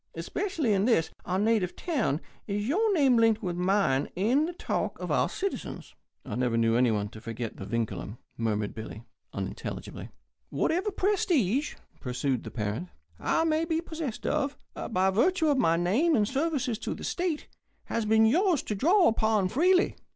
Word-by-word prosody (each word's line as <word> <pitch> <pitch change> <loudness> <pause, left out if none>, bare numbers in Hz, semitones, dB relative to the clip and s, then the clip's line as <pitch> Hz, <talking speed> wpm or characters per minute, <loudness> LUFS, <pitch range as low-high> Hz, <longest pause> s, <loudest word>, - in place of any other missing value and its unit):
Especially 300 - -1
in 195 +1 +2
this, 225 -10 +2
our 185 - -1
native 210 -3 +1
town, 255 - -1 0.3
is 205 +1 -2
your 420 - +2
name 270 -6 +4
linked 225 -1 +3
with 180 -2 -2
mine 180 -7 +1
in 245 - +2
the 350 - -5
talk - - -2
of - - -4
our - - +2
citizens." 395 0 -5 0.3
"I - - -6
never 120 0 0
knew 115 0 +3
anyone 110 -4 +2
to 110 - -12
forget 115 0 -5
the 95 - -7
vindculum," 115 -1 -3 0.2
murmured 105 -2 -1
Billy, 110 0 -8 0.3
unintelligibly. - - -6 0.4
"Whatever 365 +6 0
prestige," 315 - +1 0.2
pursued 125 0 -2
the - - -6
parent, 110 - -3 0.3
"I - - +1
may 320 0 +1
be 325 -1 0
possessed 320 -7 -5
of, 290 -2 0 0.3
by 190 -2 +2
virtue 320 - +2
of 280 -2 +2
my 165 -8 +3
name 230 - +2
and 210 -2 +2
services 270 -5 -1
to - - -3
the - - -9
state, 345 -4 -2 0.4
has 230 - -2
been 220 +1 +4
yours 335 - +3
to - - -3
draw 345 - +4
upon 220 -4 +2
freely. 360 - +3
220 Hz, 165 wpm, -28 LUFS, -, 0.4 s, name